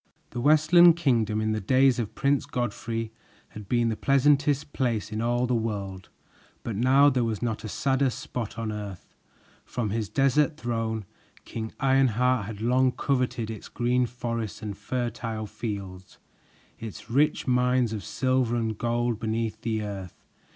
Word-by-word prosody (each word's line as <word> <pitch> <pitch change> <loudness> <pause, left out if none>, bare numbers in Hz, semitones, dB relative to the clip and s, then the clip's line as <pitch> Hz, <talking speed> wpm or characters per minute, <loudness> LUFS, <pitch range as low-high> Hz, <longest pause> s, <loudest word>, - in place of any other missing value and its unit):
The 120 - -4
Westland 155 +4 +6
Kingdom, 115 -10 +1
in 110 0 0
the 110 0 -1
days 130 +4 +3
of 110 -3 -4
Prince 140 0 +1
Godfrey, 115 -1 -3 0.4
had 105 -2 -11
been 120 -1 +2
the 110 - -1
pleasantest 145 +2 +2
place 115 -6 -1
in 110 +1 -2
all 120 +1 +1
the 125 - 0
world, 100 -5 -3 0.5
but 115 - -4
now 130 +6 +5
there 125 -2 +1
was 115 -2 -2
not 115 -2 -2
a 110 - -5
sadder 135 +3 +1
spot 120 -2 -5
on 115 -1 -3
earth. 105 -4 -7 0.5
From 115 -5 -3
his 110 -1 -2
desert 145 +3 +2
throne, 115 -5 -2 0.4
King 110 -1 -5
Ironheart 125 -4 +2
had 105 -2 -7
long 125 +2 +3
coveted 125 -4 -1
its 110 - -9
great 125 0 +1
forests 115 -3 -4
and 105 -2 -4
fertile 115 0 -3
fields, 100 -4 -6 0.6
its 115 0 -8
rich 145 +5 +2
mines 125 -2 +2
of 105 -3 -4
silver 130 -2 0
and 110 -3 -2
gold 120 -1 0
beneath 110 0 -2
the 110 -2 -1
earth. 100 -3 -6
120 Hz, 155 wpm, -26 LUFS, 110-130 Hz, 0.6 s, Westland